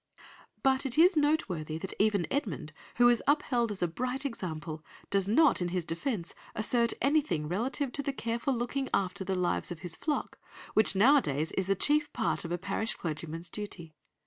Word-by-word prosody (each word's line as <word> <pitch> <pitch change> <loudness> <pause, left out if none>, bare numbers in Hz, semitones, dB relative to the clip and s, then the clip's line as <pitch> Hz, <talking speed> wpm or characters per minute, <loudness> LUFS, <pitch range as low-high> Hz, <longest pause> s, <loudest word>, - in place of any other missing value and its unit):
'" - - -26
But 265 -1 +3
it 255 - -1
is 355 +3 +6
noteworthy 195 - 0
that 190 +4 -5
even 205 -4 +3
Edmund, 170 - -2 0.2
who 240 0 +6
is 240 -1 +4
upheld 255 -5 +2
as 195 -3 -3
a - - +3
bright 255 - -3
example, 165 - -5 0.3
does 195 -1 +2
not 260 - +4
in 175 - 0
his 175 -1 -2
defence 175 - -3 0.2
assert 235 +2 +2
anything 275 - +2
relative 245 - -1
to 285 - -1
the 280 - -2
careful 235 +1 -2
looking 250 +3 -2
after 190 0 -1
the 190 0 -1
lives 180 -1 0
of 170 - -6
his 175 -3 -3
flock 300 -2 -3 0.3
which 215 -2 +3
nowadays 190 - +4
is 190 0 -2
a 195 - +4
chief 295 +8 +2
part 225 - -1
of 170 - -6
a 175 - 0
parish 200 +5 -1
clergyman's 165 +1 -5
duty. 180 -6 -7
210 Hz, 185 wpm, -30 LUFS, 175-265 Hz, 0.3 s, is